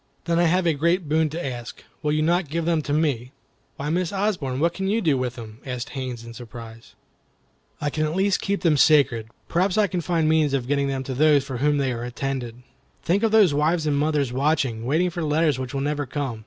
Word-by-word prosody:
"Then 170 0 +1
I 175 - +4
have 180 +2 +2
a 165 - +3
great 170 +3 +1
boon 155 +1 +2
to 165 +4 -5
ask. 120 -3 -6 0.2
Will 150 -2 0
you 155 0 +1
not 170 0 +1
give 165 +2 -2
them 165 -2 +1
to 145 - -5
me?" 140 -5 0 0.4
"Why, 145 +2 -3
Miss 175 0 0
Osborne, 190 -11 -1
what 170 +2 +2
can 190 +2 -3
you 215 +3 +1
do 160 -9 +2
with 125 -2 -2
them?" 110 -2 -10
asked 125 0 -5
Haines, 130 -4 -5
in 115 0 -10
surprise. 115 -1 -11 0.8
"I 145 0 -1
can 155 +1 0
at 155 +2 -2
least 195 +1 +1
keep 200 0 -1
them 160 -4 +3
sacred. 135 -7 +4 0.2
Perhaps 180 +3 +1
I 215 - +5
can 185 -3 -2
find 165 -1 0
means 155 -3 +3
of 125 -3 -2
getting 140 0 +1
them 135 -1 -2
to 130 - -5
those 145 +1 +4
for 135 -2 -5
whom 145 +3 +2
they 135 -3 0
are 120 0 -5
intended. 125 -1 -4 0.4
Think 190 +4 +1
of 225 - +3
those 210 -7 +5
wives 155 +3 +1
and 150 -2 +1
mothers 145 -3 0
watching, 135 -5 0
waiting 170 +6 +2
for 170 0 -4
letters 150 -2 +1
which 130 -1 -4
will 135 -1 -2
never 145 0 -2
come. 130 -4 -3
150 Hz, 235 wpm, -24 LUFS, 130-170 Hz, 0.8 s, I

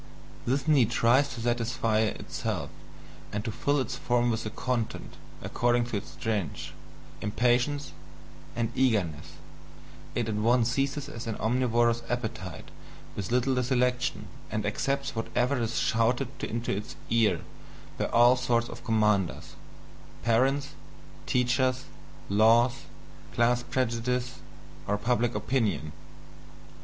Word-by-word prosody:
This 135 +4 0
need 135 -8 +5
tries 125 +4 +3
to 115 - -6
satisfy 115 -2 0
itself 110 -1 -2 0.6
and 105 +1 -3
to 115 - -1
fill 140 +5 +1
its 130 -1 -2
form 120 0 +1
with 115 - -2
a - - -2
content, 120 0 -3 0.3
according 120 0 +1
to 120 -3 -3
its 100 - -8
strength, 105 -9 -3 0.5
impatience, 125 +6 +1 0.6
and 115 -1 -1
eagerness, 100 - 0 0.8
it 120 -2 0
at 110 - -1
once 115 +3 +2
seizes 140 +2 -1
as 115 +1 -7
an 110 - -2
omnivorous 120 0 +2
appetite 110 -8 -4 0.5
with 100 -2 -4
little 125 +1 +2
selection, 125 0 0 0.2
and 105 -1 -2
accepts 135 +6 -1
whatever 125 +3 0
is 115 0 -1
shouted 120 +3 +1
into 115 -2 -2
its 105 - -6 0.2
ear 110 -7 +3 0.6
by - - +1
all 120 +2 +5
sorts 120 -2 0
of - - -9
commanders 105 -5 +1 0.7
parents, 135 +5 +2 0.6
teachers, 130 +1 +1 0.4
laws, 115 +6 +4 0.5
class 120 +1 +3
prejudices, 125 +1 -1 0.5
or 105 - +1
public 120 +1 0
opinion. 105 - 0
120 Hz, 120 wpm, -28 LUFS, 110-125 Hz, 0.8 s, need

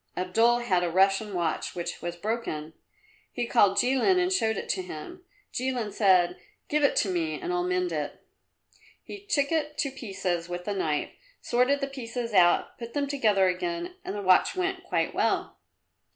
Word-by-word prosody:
Abdul 225 +7 +2
had 185 -7 +1
a 175 - 0
Russian 195 +4 +2
watch 170 -3 -2
which 175 0 -5
was 175 0 -4
broken. 175 -6 -4 0.6
He 240 - -2
called 200 -4 +3
Jilin 270 +9 +3
and 365 +1 +2
showed 220 -12 +1
it - - -5
to 375 - 0
him. 360 0 -9 0.3
Jilin 245 -5 -2
said, 180 -4 +3 0.3
"Give 300 0 +1
it 285 - +3
to - - +2
me 160 -3 -1
and 180 - -3
I'll 180 - +1
mend 180 0 0
it." 150 -2 -4 0.8
He 405 - -9
took 290 -9 0
it 300 -2 -1
to 275 - -1
pieces 185 -8 -3
with 175 0 -5
the 205 - -1
knife, 155 -6 -1 0.3
sorted 250 +4 +1
the 275 - -1
pieces 240 -3 -5
out, 175 -3 +3
put 235 +1 -8
them 285 -1 +1
together 215 -9 +2
again 345 - -2
and - - -5
the 205 - -4
watch 185 - +4
went 370 0 -2
quite - - -1
well. - - 0
220 Hz, 180 wpm, -27 LUFS, 180-280 Hz, 0.8 s, watch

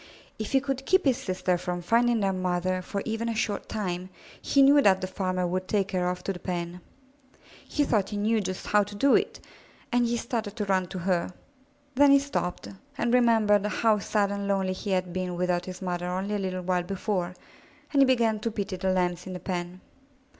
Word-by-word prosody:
If 220 +4 -4
he 270 - +6
could 270 -1 -3
keep 375 -1 +3
his 265 -3 +3
sister 185 -1 -1
from 175 0 -4
finding 235 +3 +3
their 195 -1 +1
mother 185 0 -1
for 200 +2 -4
even 225 +1 -2
a 230 - -2
short 210 -2 -2
time, 185 -4 -3 0.3
he 275 - +4
knew 285 +1 +7
that 190 -6 +4
the - - -3
farmer 185 -1 -2
would 185 +1 -2
take 200 -2 0
her 180 -2 0
off 180 0 -4
to 195 - -2
the 180 - -9
pen. 175 -1 -4 0.9
He 295 - +1
thought 215 -8 +1
he 210 - -4
knew 215 +2 +1
just 185 -1 -5
how 210 0 +4
to 205 +1 -5
do 275 +7 +3
it, - - 0 0.5
and 240 0 +3
he 235 0 0
started 225 -3 -3
to 210 -3 -2
run 190 -2 +1
to 185 - -7
her. 180 0 0 0.6
Then 285 +2 +5
he 280 - +8
stopped 275 - -3 0.3
and 240 0 0
remembered 225 -4 +4
how 215 0 +2
sad 200 0 0
and 200 0 -3
lonely 190 -2 +1
he 195 +2 -6
had 185 -2 0
been 185 -1 -3
without 180 0 0
his 185 +1 -7
mother 175 -1 -2
only 190 +3 -2
a 205 - 0
little 185 -1 -3
while 180 0 +1
before, 185 -1 -2 0.6
and 280 - +5
he - - +8
began 230 -4 +2
to 230 - -2
pity 200 -3 -4
the 190 0 0
Lambs 180 -1 0
in 185 - -5
the 180 - -5
pen. 180 -1 -4
195 Hz, 215 wpm, -27 LUFS, 180-225 Hz, 0.9 s, he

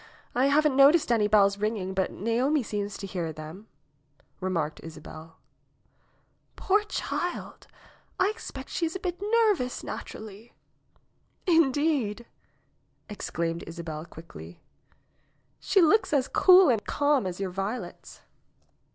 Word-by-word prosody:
I 255 +3 +3
haven't 295 0 +3
noticed 280 +1 +5
any 220 -3 +3
bells 200 -1 +4
ringing, 210 -3 -2
but 190 0 0
Naomi 245 +7 0
seems 205 -1 -4
to 200 - -7
hear 180 -4 -4
them," 155 +7 -10 0.7
remarked 170 -5 -2
Isabel. 160 0 -11 1.2
^Toor 415 +2 +2
child! 355 0 -4 0.5
I 375 +3 +3
expect 270 -11 -9
she 335 - -1
is 325 - -7
a - - -3
bit 360 0 -4
nervous 415 - +1
naturally." 215 +2 -8 0.9
^Tndeed!" 290 - +2 0.9
exclaimed 170 -4 -3
Isabel 160 -2 -6
quickly, 90 - -12 1.0
'^she 375 -5 +4
looks 425 -1 +2
as 275 -2 +2
cool 370 -3 +6
and 225 -4 +1
calm 285 -7 +1
as 180 0 -5
your 195 -2 -3
violets." 195 +6 -6
220 Hz, 115 wpm, -27 LUFS, 185-305 Hz, 1.2 s, cool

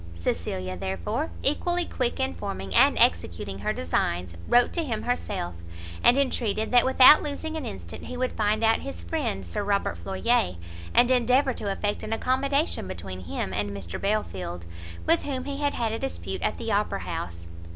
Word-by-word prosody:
Cecilia 90 +2 -2
therefore, 90 -2 -2
equally 350 - +1
quick 250 -6 -2
in 90 0 0
forming 95 +2 -5
and - - +5
executing 85 +3 +1
her 100 - -1
designs, 85 +1 -1
wrote 245 0 +4
to 340 - 0
him 225 -7 -3
herself, 245 - -2 0.5
and 245 - +6
entreated 225 -6 0
that 245 0 +6
without 260 +3 +8
losing 310 +2 -4
an 310 -4 -4
instant 85 -3 -7
he 250 - -6
would 255 0 0
find 215 +1 +1
out 225 0 +4
his 85 -2 -7
friend 95 +3 -2
Sir 85 - -2
Robert 200 0 0
Floyer, 195 - +1 0.4
and 245 +1 +5
endeavour 255 +2 +3
to 205 -4 -3
effect 205 +1 -2
an 215 - -3
accommodation 275 - 0
between 95 0 -7
him 90 +2 -3
and 100 +1 -1
Mr 100 -4 -6
Belfield, 95 - -2 0.4
with 170 - +4
whom 265 -3 -3
he 280 0 -4
had 285 0 0
had 230 -2 -1
a 225 - -3
dispute 85 0 -4
at - - 0
the - - -3
Opera - - 0
house. 85 0 -5
205 Hz, 175 wpm, -26 LUFS, -, 0.5 s, without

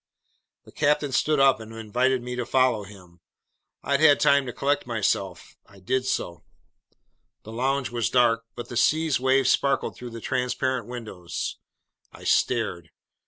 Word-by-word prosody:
The - - -15
captain 150 -1 +1
stood 150 +4 +1
up 135 -2 +5
and 110 0 -10
invited 125 +4 0
me 125 0 -5
to 125 - -2
follow 125 -4 +1
him. 90 -4 -16 0.6
I'd 140 0 +1
had 150 -2 +6
time 140 -1 +3
to - - -3
collect 140 +1 -1
myself. 100 -5 -2
I 100 - -18
did 130 +7 -1
so. 85 -8 -3 1.0
The 110 - -10
lounge 130 +3 -1
was 120 -2 -1
dark, 115 -2 +3
but 120 -1 -7
the 120 - -4
sea's 155 +1 +2
waves 130 0 +3
sparkled 140 -1 0
through 125 - -8
the 115 0 -8
transparent 130 +1 -2
windows. 110 -8 -6 0.5
I - - -14
stared. 85 -2 0
125 Hz, 155 wpm, -25 LUFS, 110-135 Hz, 1.0 s, had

